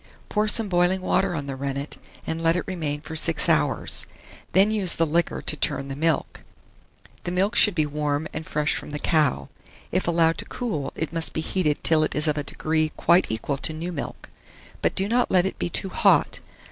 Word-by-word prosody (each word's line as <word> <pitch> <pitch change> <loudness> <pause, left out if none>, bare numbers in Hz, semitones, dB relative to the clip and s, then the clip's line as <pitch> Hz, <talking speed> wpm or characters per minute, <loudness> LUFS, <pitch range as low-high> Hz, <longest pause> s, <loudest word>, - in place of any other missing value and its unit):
Pour 210 +1 0
some 220 0 +2
boiling 180 0 +2
water 185 0 0
on 145 -3 -4
the 135 -1 -5
rennet, 140 +1 -4 0.3
and 160 0 -3
let 165 0 +2
it 180 - -1
remain 155 -6 -4
for 160 +1 -8
6 160 0 +4
hours; - - +1 0.4
then 195 +4 +4
use 200 -5 +4
the 165 - +2
liquor 165 +2 -1
to - - +2
turn 140 -1 +1
the 135 - -5
milk. 160 +2 -1 0.8
The - - -4
milk 190 +5 0
should 210 -4 +5
be 155 -3 +2
warm 150 +1 -2
and 155 - -5
fresh 150 -1 -1
from - - -6
the 150 - -4
cow: 145 - +1 0.4
if 185 0 -1
allowed 165 -1 +2
to - - -4
cool, 200 - -4
it 160 0 -4
must 165 -1 0
be 160 - -2
heated 160 -3 -1
till 160 -1 +4
it - - -2
is 150 +1 +2
of 150 - +1
a - - -3
degree 155 +2 -1
quite 175 +2 +3
equal 110 +5 -3
to 155 - -1
new 165 +3 -5
milk; 160 - -7 0.5
but - - 0
do 195 - 0
not 245 +3 +1
let 180 -1 +3
it 190 - -4
be - - -2
too 190 - -2
hot. - - +2
160 Hz, 210 wpm, -24 LUFS, 150-180 Hz, 0.8 s, should